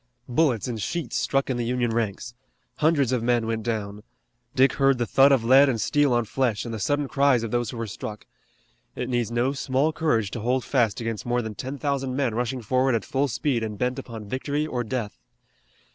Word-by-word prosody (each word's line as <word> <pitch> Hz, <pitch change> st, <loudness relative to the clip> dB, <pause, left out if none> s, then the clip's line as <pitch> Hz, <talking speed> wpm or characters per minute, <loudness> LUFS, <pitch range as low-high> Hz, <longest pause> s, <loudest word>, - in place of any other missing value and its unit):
Bullets 125 Hz, -4 st, +1 dB
in 120 Hz, -2 st, -3 dB
sheets 155 Hz, +5 st, -3 dB
struck 135 Hz, +4 st, +1 dB
in 130 Hz, -, -1 dB
the 120 Hz, -, -1 dB
Union 120 Hz, 0 st, 0 dB
ranks. 115 Hz, +1 st, -2 dB, 0.4 s
Hundreds 150 Hz, -5 st, +2 dB
of 125 Hz, -2 st, +1 dB
men 120 Hz, -1 st, +1 dB
went 115 Hz, 0 st, -2 dB
down. 105 Hz, -2 st, -3 dB, 0.5 s
Dick 135 Hz, +1 st, +4 dB
heard 135 Hz, -1 st, +3 dB
the 120 Hz, -, 0 dB
thud 135 Hz, +5 st, +5 dB
of 130 Hz, -4 st, +3 dB
lead 135 Hz, +4 st, +6 dB
and 120 Hz, -4 st, -1 dB
steel 145 Hz, +7 st, +2 dB
on 120 Hz, -1 st, +2 dB
flesh, 120 Hz, -1 st, -1 dB
and 115 Hz, -, -5 dB
the 110 Hz, -, -4 dB
sudden 145 Hz, +7 st, 0 dB
cries 140 Hz, -4 st, +3 dB
of 115 Hz, -, -4 dB
those 120 Hz, -2 st, 0 dB
who 120 Hz, -, -7 dB
were 115 Hz, -, -3 dB
struck. 105 Hz, 0 st, -7 dB, 0.7 s
It 125 Hz, -, -4 dB
needs 120 Hz, -3 st, 0 dB
no 120 Hz, +3 st, 0 dB
small 140 Hz, +3 st, 0 dB
courage 115 Hz, -11 st, 0 dB
to 120 Hz, -, -4 dB
hold 125 Hz, +2 st, 0 dB
fast 120 Hz, -5 st, +1 dB
against 115 Hz, -2 st, -3 dB
more 120 Hz, 0 st, +1 dB
than 110 Hz, -1 st, -5 dB
ten 130 Hz, +6 st, -6 dB
thousand 135 Hz, -2 st, -2 dB
men 130 Hz, -4 st, 0 dB
rushing 120 Hz, +2 st, -2 dB
forward 130 Hz, +2 st, +2 dB
at 115 Hz, -, -2 dB
full 140 Hz, +1 st, 0 dB
speed 130 Hz, 0 st, -1 dB
and 105 Hz, -2 st, -4 dB
bent 125 Hz, +3 st, -1 dB
upon 110 Hz, -3 st, -8 dB
victory 140 Hz, +7 st, -2 dB
or 125 Hz, -5 st, -2 dB
death. 115 Hz, -, -4 dB
125 Hz, 215 wpm, -25 LUFS, 115-135 Hz, 0.7 s, lead